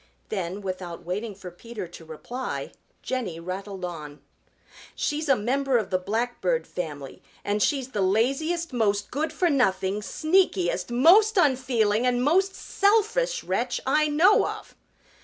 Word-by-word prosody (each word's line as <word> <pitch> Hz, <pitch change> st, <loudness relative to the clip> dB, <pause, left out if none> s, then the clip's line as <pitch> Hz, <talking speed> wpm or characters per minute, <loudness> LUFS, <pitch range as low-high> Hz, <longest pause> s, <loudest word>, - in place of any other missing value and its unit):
Then 190 Hz, -1 st, -3 dB
without 185 Hz, -3 st, -6 dB
waiting 205 Hz, +4 st, -4 dB
for 185 Hz, -2 st, -9 dB
Peter 210 Hz, +1 st, -8 dB
to 170 Hz, -1 st, -12 dB
reply, 200 Hz, +11 st, -6 dB, 0.3 s
Jenny 225 Hz, -11 st, -3 dB
rattled 190 Hz, +2 st, -5 dB
on. 150 Hz, -4 st, -7 dB, 0.8 s
"She's 300 Hz, 0 st, -2 dB
a 275 Hz, -, +6 dB
member 260 Hz, +4 st, +1 dB
of 215 Hz, -4 st, -3 dB
the 185 Hz, -, +2 dB
Blackbird 240 Hz, -, -1 dB
family 145 Hz, -6 st, -6 dB, 0.2 s
and 205 Hz, +1 st, 0 dB
she's 270 Hz, -1 st, +1 dB
the 210 Hz, -6 st, -2 dB
laziest, 275 Hz, -, 0 dB
most 205 Hz, -4 st, 0 dB
good 305 Hz, +4 st, -1 dB
for 360 Hz, -, +1 dB
nothing, 195 Hz, -6 st, +1 dB
sneakiest, 205 Hz, -, +1 dB
most 370 Hz, -, +5 dB
unfeeling 250 Hz, -, +2 dB
and 245 Hz, 0 st, +1 dB
most 380 Hz, +7 st, +2 dB
selfish 455 Hz, +4 st, +1 dB
wretch -, -, -1 dB
I 305 Hz, 0 st, +3 dB
know 330 Hz, +8 st, +4 dB
of!" -, -, -7 dB
235 Hz, 140 wpm, -25 LUFS, 190-300 Hz, 0.8 s, a